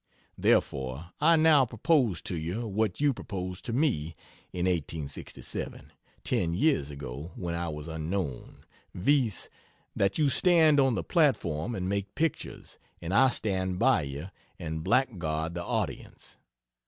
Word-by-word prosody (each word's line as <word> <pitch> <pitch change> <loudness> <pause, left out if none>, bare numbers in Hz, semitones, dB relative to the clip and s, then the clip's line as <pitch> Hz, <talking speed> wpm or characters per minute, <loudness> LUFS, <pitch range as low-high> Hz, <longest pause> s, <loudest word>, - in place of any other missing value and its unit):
Therefore, 65 +6 0
I 165 +3 +6
now 155 -3 +6
propose 120 - +1
to 90 - -3
you 85 +9 -3
what 105 -1 -1
you 145 -1 +3
proposed 90 -5 -6
to - - -3
me 115 - 0 0.4
in 90 0 -2
1867, 80 -5 -4 0.3
ten 85 0 0
years 105 - +2
ago 70 +3 -7
(when 85 -2 -4
I 85 0 -2
was 75 0 -6
unknown) 80 -3 -4 0.3
viz., 120 - +1 0.5
that 100 0 +1
you 150 - +3
stand 160 -2 +5
on 135 -3 +3
the - - -2
platform 120 - +1
and 90 -2 -3
make 100 0 -2
pictures, 160 +1 -3 0.2
and 85 +2 -4
I 130 +5 +6
stand 95 -6 -1
by 130 -1 +4
you 70 +5 -6 0.3
and 80 -1 -4
blackguard 85 -8 0
the 85 0 -4
audience. - - -4
95 Hz, 140 wpm, -29 LUFS, 80-130 Hz, 0.5 s, I